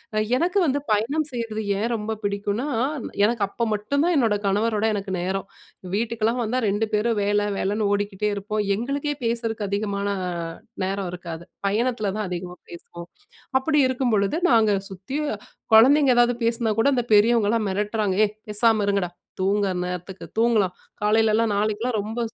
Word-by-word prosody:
அ - - 0 0.2
எனக்கு 360 +6 0
வந்து 285 +1 +1
பயணம் 280 +9 0
செய்றது 225 -3 -3 0.2
ஏன் 230 +3 -1
ரொம்ப 215 0 -4
பிடிக்குனா, 205 +6 -1 0.6
எனக்கு 225 -1 0
அப்ப 235 - -9
மட்டும் 255 +9 0
தான் 350 -1 +2
என்னோட 225 -5 +3
கணவரோட 215 +2 +1
எனக்கு 195 -1 -4
நேரம், 190 +1 -2 0.5
வீட்டுக்குலாம் 230 +2 0
வந்தா 235 +4 -1
2 205 +3 +1
பேரும் 220 +1 +1
வேலை 205 0 +1
வேலைன்னு 205 +2 0
ஓடிக்கிட்டே 205 0 -1
இருப்போம், 210 +1 -2
எங்களுக்கே 280 +6 -2
பேசறதுக்கு 230 -2 -1
அதிகமான 200 0 -2 0.8
நேரம் 190 -1 -2
இருக்காது. 170 -2 -7 0.2
பயணத்தில 220 0 0
தான் 215 - -2
அதிகமா 180 0 -5
பேசுவோம், 170 0 -10 0.5
அப்பிடி 300 +3 +1
இருக்கும்பொழுது 245 -1 +1
நாங்க 220 -3 +4 0.2
சுத்தி 195 +9 -6 0.6
குழந்தைங்க 270 +5 +7
எதாவது 240 0 +4
பேசினா 230 0 +1
கூட 275 - +4
அந்த 245 - +1
பெரியவங்கலாம் 220 0 +4
மிரட்டுறாங்க, 205 0 -1
ஏய்! 210 - -6
பேசாம 215 0 +3
இருங்கடா! 200 -3 0 0.3
தூங்குற 195 0 +1
நேரத்துக்கு 180 +1 -6
தூங்கலாம் 220 -6 +3 0.3
காலையிலலாம் 220 +1 +3
நாளைக்குலாம் 215 +3 0
ரொம்ப 220 +3 -5
215 Hz, 140 wpm, -24 LUFS, 200-235 Hz, 0.8 s, குழந்தைங்க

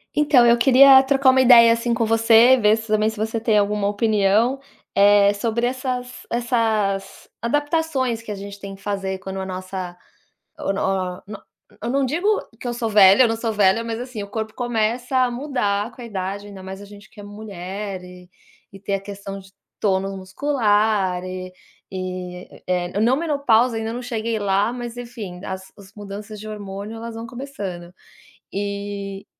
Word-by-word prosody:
Então 290 -5 +5
eu 235 - +6
queria 265 +1 +8
trocar 270 0 +4
uma 260 0 +4
ideia, 235 -2 +8
assim, 230 +1 -2
com 230 -1 +1
você, 225 +2 +6
ver 210 -2 +4
se 220 0 -8
também 215 0 +2
se 220 - -8
você 220 +2 -2
tem 220 -1 +2
alguma 205 0 +1
opinião, 215 +4 +2 0.3
eh, 200 0 +5
sobre 230 +3 -1
essas 250 0 -4
essas 220 -5 -1
adaptações 290 -2 0
que 225 - -8
a - - -3
gente 200 0 -9
tem 195 0 -8
que 195 - -19
fazer 195 -1 -3
quando 190 0 -6
a 190 - -4
nossa, 185 -1 -6 0.6
oh - - -1
no 190 -2 -2
no 210 0 -9 0.4
eu 230 - -3
não 275 +1 +1
digo 325 +9 -2 0.3
que - - -7
eu - - -1
sou 235 -1 -2
velha, 200 +1 +7
eu - - +3
não 225 - -1
sou 225 0 -2
velha, 205 +1 +3
mas 225 -1 -4
assim, 245 -4 -6
o - - -12
corpo 220 +1 -4
começa 240 +1 -1
a 255 -1 +3
mudar 240 -5 -1
com 225 - -14
a - - -7
idade, 200 -1 -5
ainda 195 -2 -10
mais 190 +1 -8
a - - -10
gente 205 -1 -14
que - - -14
é - - -9
mulher, 200 -1 -7 0.7
e 195 - -11
ter 200 +1 -2
a 195 - -1
questão 195 0 -8
de 190 0 -17 0.3
tônus 195 -1 0
muscular, 205 -3 0
e 185 0 -6 0.4
e 185 -1 -6 0.2
eh, 180 +2 -1
não 240 +4 +3
menopausa 270 -7 +2
ainda 225 0 -3
não 245 - -5
cheguei 230 -2 -3
lá 200 +3 +1
mas 240 -1 -6
enfim 230 -7 -8
as 190 0 -7 0.2
mudanças 205 +1 -8
de 215 - -9
hormônio 205 +1 -7
elas 230 0 -7
vão 225 +1 -6
começando, 205 -9 -7 0.6
e 200 0 -5
215 Hz, 180 wpm, -22 LUFS, 195-240 Hz, 0.7 s, queria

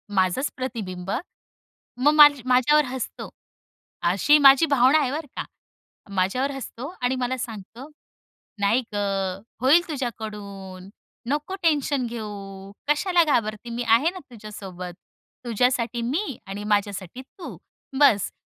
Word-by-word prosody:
माझंच 190 +9 +1
प्रतिबिंब. 195 -8 -5 0.9
मग 285 +4 +4
माझ्या 290 -4 +7
माझ्यावर 285 +4 +4
हसतो, 255 -1 -6 0.8
अशी 290 +11 +4
माझी 275 +1 +7
भावना 280 0 +4
आहे 270 -4 0
बरं 300 +1 -4
का. - - -3 0.7
माझ्यावर 200 +9 0
हसतो 270 -1 -7
आणि 250 +1 +1
मला 255 0 -2
सांगतो, 230 +3 -8 0.7
"नाही 210 +5 +3
गं! 195 -2 -2 0.2
होईल 280 +7 +6
तुझ्याकडून 205 - -6 0.4
नको 295 +7 -2
टेन्शन 290 -4 +1
घेऊ. 200 -4 -8 0.2
कशाला 345 +4 +3
घाबरते 225 -6 -1
मी 245 - -2
आहे 235 +9 +4
ना 370 - -9
तुझ्यासोबत, 195 -5 -8 0.5
तुझ्यासाठी 240 0 0
मी 275 - -2
आणि 200 +2 -6
माझ्यासाठी 205 +1 -2
तू 335 +7 -11 0.4
बस्स." 215 -9 +4
245 Hz, 115 wpm, -24 LUFS, 200-280 Hz, 0.9 s, माझ्या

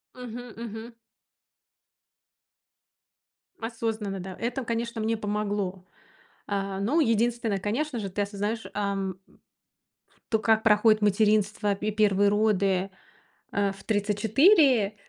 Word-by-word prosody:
Мгм, 245 -1 -8
мгм. 230 0 -7 2.7
Осознанно, 225 -3 -3
да. 185 0 -7
Это, 245 +4 -2
конечно, 230 0 -3
мне 225 +1 0
помогло. 205 -3 -3 0.6
А, 195 -1 -2
ну, 260 +12 +2
единственное, 230 -4 +1
конечно 240 +7 -2
же, 200 -3 -4
ты 205 +2 -1
осознаешь, 205 +2 -3
ам 195 -2 -2 1.2
то, 220 - +4
как 220 0 +2
проходит 215 0 +4
материнство, 210 0 +2
пе 205 +2 -3
и - - -1
1 205 -1 +3
роды, 200 -3 +1 0.6
э, 200 -1 0
в 195 - -14
34, 220 - +3
210 Hz, 105 wpm, -27 LUFS, 200-230 Hz, 2.7 s, то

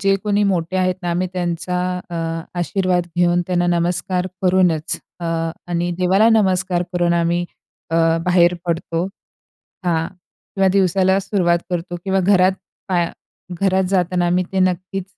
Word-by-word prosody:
जे 195 -1 +3
कोणी 205 0 +1
मोठे 185 -2 0
आहेत 185 -1 +1
ना 175 - -1
आम्ही 180 +2 -1
त्यांचा 180 0 -2 0.3
अ, - - -5 0.4
आशीर्वाद 180 0 0
घेऊन 175 0 +3
त्यांना 175 -1 +1
नमस्कार 180 +1 -1 0.2
करूनच 180 -4 +2 0.2
अ, - - -5 0.4
आणि 175 0 -1
देवाला 190 +5 +4
नमस्कार 185 -2 +1
करून 175 -1 +1
आम्ही 170 +1 +1 0.5
अ, 165 - +1 0.3
बाहेर 180 -1 +4
पडतो 165 0 -1 0.8
हां. 165 -2 +1 0.5
किंवा 195 -1 +3
दिवसाला 190 0 +3
सुरुवात 180 -3 +1
करतो 175 0 -3
किंवा 190 0 +1
घरात 185 0 +4 0.4
पाया 175 -2 0 0.5
घरात 190 -1 +2
जाताना 180 -2 +1
आम्ही 180 +1 +1
ते 190 - 0
नक्कीच 185 +1 -1
180 Hz, 140 wpm, -20 LUFS, 175-190 Hz, 0.8 s, देवाला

